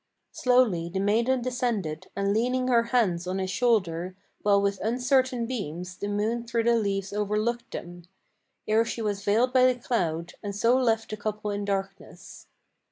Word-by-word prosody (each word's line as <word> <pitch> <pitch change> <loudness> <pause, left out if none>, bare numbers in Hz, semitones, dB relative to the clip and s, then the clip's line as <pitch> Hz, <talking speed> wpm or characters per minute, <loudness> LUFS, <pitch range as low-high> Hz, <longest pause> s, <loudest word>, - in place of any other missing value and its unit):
Slowly 240 -10 +2
the 190 +2 -3
maiden 235 +6 +2
descended, 235 - -2
and 200 0 0
leaning 250 +3 +1
her 235 -2 +4
hands 195 -8 +1
on 185 +1 -2
his 190 -1 -2
shoulder, 185 -8 0 0.3
While 200 -1 +4
with 200 0 0
uncertain 250 +2 +1
beams, 180 -7 -5
the 205 - -4
moon 215 +3 -1
through 230 0 0
the 235 +1 +3
leaves 200 -3 -1
overlooked 210 +3 -1
them, 175 0 -8 0.6
Ere 220 +1 +4
she 230 0 -4
was 205 -2 -2
veiled 230 +6 +2
by 255 -1 +6
the 245 - -6
cloud, 170 -9 -2
and 200 -1 -5
so 230 +4 +3
left 225 -4 +1
the 215 - -4
couple 210 0 -3
in 205 0 -3
darkness. 195 -1 -5
215 Hz, 165 wpm, -27 LUFS, 195-240 Hz, 0.6 s, by